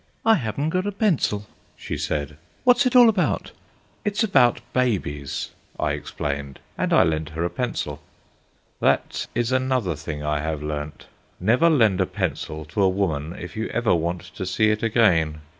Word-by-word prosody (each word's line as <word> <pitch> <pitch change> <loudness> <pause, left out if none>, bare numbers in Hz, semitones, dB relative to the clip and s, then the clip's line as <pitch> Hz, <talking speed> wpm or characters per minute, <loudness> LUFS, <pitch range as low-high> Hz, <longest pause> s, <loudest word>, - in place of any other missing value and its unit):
"I 225 - +7
haven't 145 - -1
got 185 +3 0
a - - 0
pencil," 175 - 0 0.3
she - - -5
said; 75 0 -3 0.3
"what's 255 +1 +5
it 255 - -1
all 245 -1 +9
about?" 205 -5 +1 0.5
"It's 210 +2 0
about 130 - +4
babies," 75 - -1 0.3
I - - +1
explained, 70 -1 -4 0.2
and - - -1
I - - +6
lent 80 -1 -1
her 80 +1 -3
a 85 - -2
pencil. 125 -2 -3 0.8
That - - +1
is 120 +1 0
another 130 -8 +1
thing 75 0 -6
I 75 0 0
have 75 0 -3
learnt. 75 -1 -5 0.3
Never 120 - +4
lend 110 - +3
a 95 - +1
pencil 75 0 -3
to 85 +7 -2
a 95 - +5
woman 85 -4 -1
if 90 +1 -8
you 110 +1 -2
ever 120 -2 +1
want 85 +1 -1
to 90 +1 -8
see 110 +4 +2
it 105 - -1
again. 85 -10 +2
100 Hz, 170 wpm, -23 LUFS, 80-130 Hz, 0.8 s, all